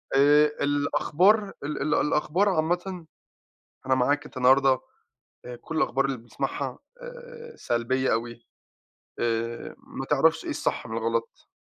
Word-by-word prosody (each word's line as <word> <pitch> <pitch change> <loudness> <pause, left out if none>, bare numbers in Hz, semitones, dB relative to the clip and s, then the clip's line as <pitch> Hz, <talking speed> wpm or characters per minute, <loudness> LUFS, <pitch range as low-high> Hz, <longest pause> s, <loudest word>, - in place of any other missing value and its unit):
آآ، 145 +2 +6 0.2
الأخبار 170 +8 +2
ال 145 0 -4
ال 150 +2 0
الأخبار 165 +6 +1
عامةً، 175 +1 -1 0.8
أنا 130 - +3
معاك، 145 +3 +1
أنتَ 150 - -14
النهارده 130 +1 +4 0.6
آآ 125 0 -7
كل 160 +7 -8
الأخبار 135 -3 +1
اللي 135 -1 -1
بنسمَعها 115 +1 -4 0.2
آآ، 485 -2 -11
سلبية 130 - 0
أوي، 115 +1 -4 0.7
آآ، 115 0 -2
ما - - -8
تعرفش - - +2
إيه - - -4
الصح - - -2
من 110 - -5
الغلَط، 115 0 -3
140 Hz, 130 wpm, -26 LUFS, 120-170 Hz, 0.8 s, آآ